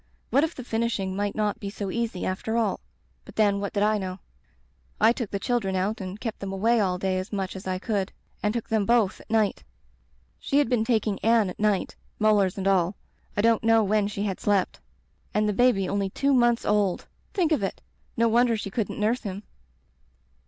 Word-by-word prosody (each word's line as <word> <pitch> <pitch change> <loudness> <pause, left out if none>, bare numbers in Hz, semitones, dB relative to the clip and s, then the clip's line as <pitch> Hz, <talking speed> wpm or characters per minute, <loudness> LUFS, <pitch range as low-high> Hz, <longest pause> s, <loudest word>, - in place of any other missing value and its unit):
What 280 +3 +4
if 325 +1 -1
the 255 - -7
finishing 225 -5 -1
might 205 0 -2
not 210 -1 -1
be 200 - -5
so 200 -1 -4
easy, 230 -5 -2
after 220 +5 -2
all? 230 - +1 0.4
But - - -14
then, 205 -2 +3
what 200 0 -4
did 205 - +1
I 215 0 +2
know? 185 -1 -4 0.8
I 220 +2 +6
took 235 -3 -3
the 200 - -2
children 200 -3 -1
out 200 +4 -1
and 190 +2 -6
kept 225 -2 -4
them 195 -1 -5
away 225 +5 +2
all 185 -3 +1
day 185 0 0
as 185 - -6
much 195 -3 -3
as 190 0 -8
I 185 0 -1
could, 200 -1 -2 0.3
and 210 - +1
took 235 0 -3
them 220 -3 +1
both 230 -5 +2
at - - -19
night. 220 -3 +1 0.8
She 280 - 0
had 290 -5 +3
been 245 -3 +2
taking 220 -4 0
Anne 225 -4 +3
at - - -13
night, 210 -2 +1 0.2
molars 205 -3 +3
and 195 0 -1
all. 190 -1 +2 0.4
I - - +3
don't 230 -1 +3
know 225 0 +5
when 210 0 +2
she 205 0 -3
had 195 -3 -2
slept. 200 -3 +1 0.6
And 210 0 +2
the 210 - +1
baby 220 -4 +3
only 200 0 -1
two 280 +8 +1
months 240 -2 +3
old! 205 -3 +1 0.3
Think 350 -5 +2
of 305 - +2
it! 195 - -3 0.4
No 230 0 +4
wonder 235 0 +3
she 200 -2 -5
couldn't 215 0 -2
nurse 225 +4 +1
him. 200 -2 -6
210 Hz, 210 wpm, -26 LUFS, 195-230 Hz, 0.8 s, I